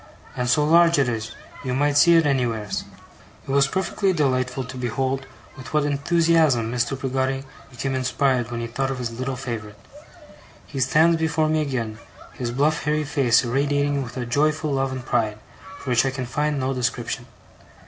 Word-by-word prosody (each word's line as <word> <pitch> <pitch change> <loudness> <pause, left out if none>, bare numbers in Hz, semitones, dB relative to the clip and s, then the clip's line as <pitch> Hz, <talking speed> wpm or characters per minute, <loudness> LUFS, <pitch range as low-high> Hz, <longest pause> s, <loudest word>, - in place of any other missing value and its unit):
And 125 -1 -1
so 150 +4 +3
large 170 +1 +5
it 140 -3 +3
is, 110 -2 -3 0.3
you 125 -2 -2
might 145 +1 +1
see 170 +4 +6
it 165 -1 +5
anywheres.' 120 -7 -1 0.6
It - - -3
was 140 0 +4
perfectly 190 +3 0
delightful 130 -4 0
to 125 +1 -9
behold 130 +2 -2 0.3
with 130 +3 -8
what 150 - +3
enthusiasm 145 -4 +2
Mr. 125 +2 -1
Peggotty 135 0 -1 0.3
became 135 +1 -3
inspired 130 -1 0
when 120 -1 -4
he - - -2
thought 135 +3 -2
of 135 - -3
his 120 -2 -3
little 130 +3 -3
favourite. 115 -5 -6 0.9
He 135 - -6
stands 160 +6 +4
before 160 -1 +1
me 155 0 +2
again, 120 -7 -3 0.3
his 120 -2 -4
bluff 145 +6 0
hairy 150 +1 +1
face 135 -5 +3
irradiating 140 +3 0
with 125 -1 -7
a 125 - -2
joyful 150 +4 +1
love 135 -1 0
and 130 -2 -6
pride, 110 -3 0 0.4
for 130 - -5
which 120 -1 +4
I 135 - +1
can 130 -1 -4
find 145 +4 -1
no 130 +1 -1
description. 120 -1 -2
135 Hz, 180 wpm, -23 LUFS, 120-145 Hz, 0.9 s, see